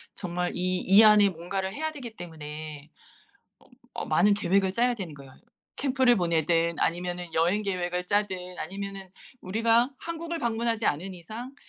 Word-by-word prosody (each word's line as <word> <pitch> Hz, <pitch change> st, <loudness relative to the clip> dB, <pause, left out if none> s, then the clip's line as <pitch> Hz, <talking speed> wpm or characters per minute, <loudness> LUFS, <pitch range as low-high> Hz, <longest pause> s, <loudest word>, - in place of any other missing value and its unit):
정말 180 Hz, -1 st, -2 dB
이 185 Hz, 0 st, 0 dB
이 200 Hz, +4 st, +7 dB
안에 210 Hz, -2 st, +7 dB
뭔가를 190 Hz, +2 st, -4 dB
해야 315 Hz, +4 st, -2 dB
되기 250 Hz, -7 st, -9 dB
때문에 155 Hz, -2 st, -8 dB, 0.7 s
어 -, -, -24 dB, 0.3 s
어 -, -, -4 dB
많은 175 Hz, +6 st, +4 dB
계획을 195 Hz, -1 st, +1 dB
짜야 245 Hz, +4 st, +2 dB
되는 185 Hz, -8 st, -6 dB
거예요. 140 Hz, -2 st, -13 dB, 0.4 s
캠프를 260 Hz, -3 st, +3 dB
보내든 170 Hz, -2 st, +1 dB
아니면은 175 Hz, +1 st, -1 dB
여행 175 Hz, +6 st, +2 dB
계획을 180 Hz, -2 st, -2 dB
짜든 185 Hz, -3 st, -1 dB
아니면은 195 Hz, +2 st, -6 dB, 0.3 s
우리가 230 Hz, +6 st, +2 dB
한국을 335 Hz, 0 st, -5 dB
방문하지 230 Hz, -3 st, -1 dB
않은 180 Hz, +6 st, -1 dB
이상 220 Hz, +9 st, -8 dB
190 Hz, 335 characters per minute, -27 LUFS, 175-225 Hz, 0.7 s, 이